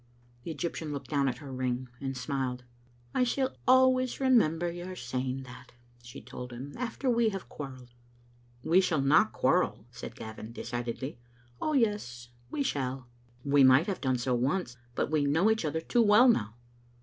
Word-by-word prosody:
The 125 Hz, -, -8 dB
Egyptian 160 Hz, 0 st, -4 dB
looked 140 Hz, +1 st, -6 dB
down 140 Hz, -2 st, +2 dB
at 125 Hz, -2 st, -1 dB
her 140 Hz, 0 st, -9 dB
ring, 130 Hz, 0 st, -2 dB
and 135 Hz, -1 st, -4 dB
smiled. 130 Hz, -1 st, -3 dB, 0.3 s
" 120 Hz, 0 st, -32 dB
I 255 Hz, -, +3 dB
shall 260 Hz, +2 st, 0 dB
always 255 Hz, 0 st, +4 dB
remember 175 Hz, -, +3 dB
your 175 Hz, +2 st, -7 dB
saying 130 Hz, -1 st, -3 dB
that," 125 Hz, 0 st, -13 dB, 0.3 s
she 120 Hz, 0 st, -11 dB
told 125 Hz, -1 st, -8 dB
him, 130 Hz, +4 st, -8 dB
"after 250 Hz, +2 st, -4 dB
we 235 Hz, -2 st, +3 dB
have 195 Hz, -3 st, -6 dB
quarrelled." 130 Hz, -4 st, -9 dB, 0.7 s
"We 175 Hz, +4 st, +5 dB
shall 160 Hz, -6 st, +1 dB
not 145 Hz, +3 st, +4 dB
quarrel," -, -, +1 dB
said -, -, -8 dB
Gavin, 110 Hz, +1 st, -8 dB
decidedly. 120 Hz, +2 st, -5 dB, 0.4 s
"Oh, 310 Hz, -, 0 dB
yes, 205 Hz, -, 0 dB, 0.2 s
we 285 Hz, -, -1 dB
shall." 130 Hz, -, -3 dB, 0.4 s
"We 140 Hz, 0 st, +5 dB
might 130 Hz, +4 st, +6 dB
have 195 Hz, -3 st, -3 dB
done 130 Hz, -2 st, +1 dB
so 125 Hz, +1 st, -1 dB
once, 130 Hz, +2 st, 0 dB, 0.2 s
but -, -, -1 dB
we 150 Hz, -2 st, +2 dB
know 165 Hz, +10 st, +3 dB
each 220 Hz, -6 st, 0 dB
other 160 Hz, +2 st, -1 dB
too 240 Hz, +8 st, +2 dB
well 220 Hz, +3 st, +6 dB
now." 110 Hz, -, +2 dB
140 Hz, 175 wpm, -30 LUFS, 125-195 Hz, 0.7 s, might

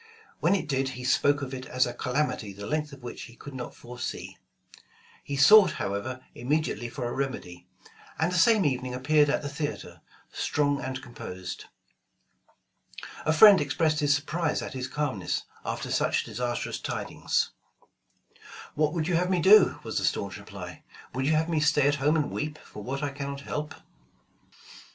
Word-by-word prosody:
When 180 Hz, +4 st, +3 dB
it 195 Hz, -, -2 dB
did, 135 Hz, -2 st, 0 dB
he 125 Hz, -, -7 dB
spoke 145 Hz, +3 st, +2 dB
of 135 Hz, 0 st, -5 dB
it 130 Hz, 0 st, -6 dB
as 130 Hz, 0 st, +2 dB
a 120 Hz, -, -4 dB
"calamity 125 Hz, -5 st, -1 dB
the 100 Hz, +1 st, -8 dB
length 150 Hz, +4 st, -2 dB
of 140 Hz, -2 st, -12 dB
which 120 Hz, -, -7 dB
he 115 Hz, -, -14 dB
could 145 Hz, +3 st, -10 dB
not 125 Hz, -2 st, -6 dB
foresee." 120 Hz, 0 st, -6 dB, 0.9 s
He 140 Hz, -, -4 dB
sought 185 Hz, +5 st, +8 dB
however 110 Hz, +6 st, -3 dB
immediately 130 Hz, -2 st, -1 dB
for 120 Hz, 0 st, -4 dB
a 120 Hz, -, -4 dB
remedy; 130 Hz, -10 st, -4 dB, 0.5 s
and 160 Hz, +2 st, +1 dB
the 180 Hz, -, +1 dB
same 220 Hz, -1 st, +5 dB
evening 130 Hz, -2 st, -1 dB
appeared 145 Hz, +3 st, +3 dB
at 150 Hz, -, 0 dB
the -, -, -3 dB
theater, 145 Hz, +1 st, -5 dB, 0.3 s
strong 145 Hz, -1 st, 0 dB
and 130 Hz, -1 st, -5 dB
composed. 95 Hz, -6 st, -7 dB, 1.6 s
A -, -, +5 dB
friend 195 Hz, +4 st, +8 dB
expressed 155 Hz, +2 st, +1 dB
his 145 Hz, -2 st, +3 dB
surprise 155 Hz, +2 st, -1 dB
at -, -, -6 dB
his 130 Hz, -1 st, -4 dB
calmness, 130 Hz, -9 st, -2 dB, 0.2 s
after -, -, -4 dB
such -, -, +1 dB
disastrous 120 Hz, 0 st, -3 dB
tidings. -, -, -1 dB, 1.2 s
*'What 150 Hz, +1 st, +1 dB
would 160 Hz, -2 st, -1 dB
you 180 Hz, -, 0 dB
have 180 Hz, +1 st, 0 dB
me 185 Hz, -2 st, +2 dB
do?" 200 Hz, +3 st, +6 dB
was -, -, -2 dB
the -, -, -4 dB
staunch -, -, -1 dB
reply. -, -, -9 dB, 0.3 s
"Would 130 Hz, +2 st, -1 dB
you 155 Hz, -, +3 dB
have 155 Hz, +1 st, +2 dB
me 165 Hz, -2 st, +1 dB
stay 150 Hz, -2 st, +3 dB
at 145 Hz, -, +3 dB
home 150 Hz, +3 st, +3 dB
and 150 Hz, -2 st, 0 dB
weep, 150 Hz, 0 st, -3 dB
for 105 Hz, -, -11 dB
what 135 Hz, +6 st, -4 dB
I 145 Hz, -, -1 dB
cannot 140 Hz, 0 st, -5 dB
help 150 Hz, +1 st, -4 dB
145 Hz, 175 wpm, -27 LUFS, 130-155 Hz, 1.6 s, sought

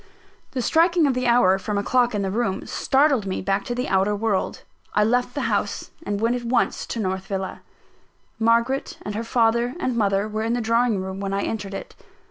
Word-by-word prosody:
The 255 Hz, -, -1 dB
striking 335 Hz, +2 st, +3 dB
of 275 Hz, -, +2 dB
the 255 Hz, 0 st, -1 dB
hour 195 Hz, -6 st, +4 dB
from 205 Hz, +1 st, -3 dB
a 200 Hz, -, 0 dB
clock 245 Hz, 0 st, +2 dB
in 200 Hz, -, 0 dB
the 190 Hz, -, -1 dB
room, 205 Hz, -3 st, -1 dB
startled 270 Hz, -6 st, +2 dB
me 185 Hz, -, -2 dB
back 195 Hz, +1 st, 0 dB
to 240 Hz, -, -3 dB
the 250 Hz, +1 st, -2 dB
outer 195 Hz, +2 st, +2 dB
world. 205 Hz, -2 st, -1 dB, 0.3 s
I 210 Hz, -, +4 dB
left 245 Hz, +3 st, +1 dB
the -, -, -1 dB
house -, -, -1 dB
and 205 Hz, -6 st, -2 dB
went 230 Hz, +3 st, +1 dB
at 245 Hz, -, -4 dB
once 240 Hz, +1 st, 0 dB
to 230 Hz, -, -4 dB
North 190 Hz, -2 st, -2 dB
Villa. 190 Hz, -1 st, -4 dB, 0.8 s
Margaret 235 Hz, +4 st, +1 dB
and 205 Hz, -, -4 dB
her 220 Hz, +2 st, -3 dB
father 235 Hz, +1 st, +1 dB
and 255 Hz, -8 st, -1 dB
mother 200 Hz, -2 st, +1 dB
were 215 Hz, 0 st, -3 dB
in 225 Hz, +1 st, 0 dB
the 245 Hz, -, 0 dB
drawing 230 Hz, -1 st, +2 dB
room 190 Hz, +1 st, -5 dB
when 195 Hz, 0 st, -3 dB
I 200 Hz, -, -1 dB
entered 200 Hz, -3 st, -4 dB
it. -, -, -7 dB
225 Hz, 215 wpm, -23 LUFS, 200-245 Hz, 0.8 s, hour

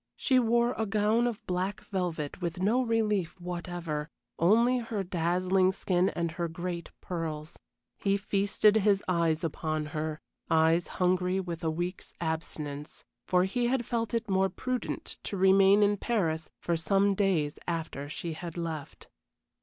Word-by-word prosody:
She 260 Hz, -2 st, +3 dB
wore 235 Hz, 0 st, +3 dB
a 220 Hz, -, 0 dB
gown 215 Hz, +3 st, +2 dB
of 235 Hz, -4 st, -4 dB
black 185 Hz, +2 st, -2 dB
velvet 175 Hz, -5 st, -3 dB
with 175 Hz, +1 st, -3 dB
no 215 Hz, +7 st, +3 dB
relief 210 Hz, -7 st, 0 dB
whatever, 175 Hz, -3 st, -4 dB, 0.3 s
only 235 Hz, +8 st, +4 dB
her 225 Hz, -4 st, -3 dB
dazzling 185 Hz, +2 st, +2 dB
skin 185 Hz, -1 st, +1 dB
and 170 Hz, -1 st, -2 dB
her 170 Hz, +1 st, -2 dB
great 170 Hz, 0 st, -5 dB
pearls. 160 Hz, -3 st, -5 dB, 0.4 s
He 200 Hz, 0 st, +2 dB
feasted 205 Hz, +1 st, +3 dB
his 200 Hz, -2 st, +3 dB
eyes 170 Hz, -2 st, +1 dB
upon 155 Hz, -1 st, -2 dB
her 155 Hz, 0 st, -2 dB, 0.3 s
eyes 160 Hz, +1 st, +3 dB
hungry 180 Hz, +1 st, +2 dB
with 170 Hz, -3 st, -5 dB
a 160 Hz, -, +1 dB
week's 175 Hz, +3 st, -4 dB
abstinence; 155 Hz, -3 st, -4 dB, 0.2 s
for 180 Hz, 0 st, +4 dB
he 240 Hz, +6 st, 0 dB
had 245 Hz, -1 st, 0 dB
felt 230 Hz, -1 st, -1 dB
it 230 Hz, 0 st, -1 dB
more 190 Hz, -1 st, +2 dB
prudent 250 Hz, +5 st, -4 dB
to 200 Hz, -, -4 dB
remain 195 Hz, +2 st, +6 dB
in 205 Hz, 0 st, +3 dB
Paris 165 Hz, -9 st, -1 dB
for 170 Hz, -, 0 dB
some 195 Hz, +4 st, +2 dB
days 180 Hz, -7 st, +1 dB
after 160 Hz, -4 st, -3 dB
she 165 Hz, +2 st, -4 dB
had 170 Hz, +1 st, -7 dB
left. 160 Hz, -4 st, -5 dB
180 Hz, 150 wpm, -29 LUFS, 165-205 Hz, 0.4 s, remain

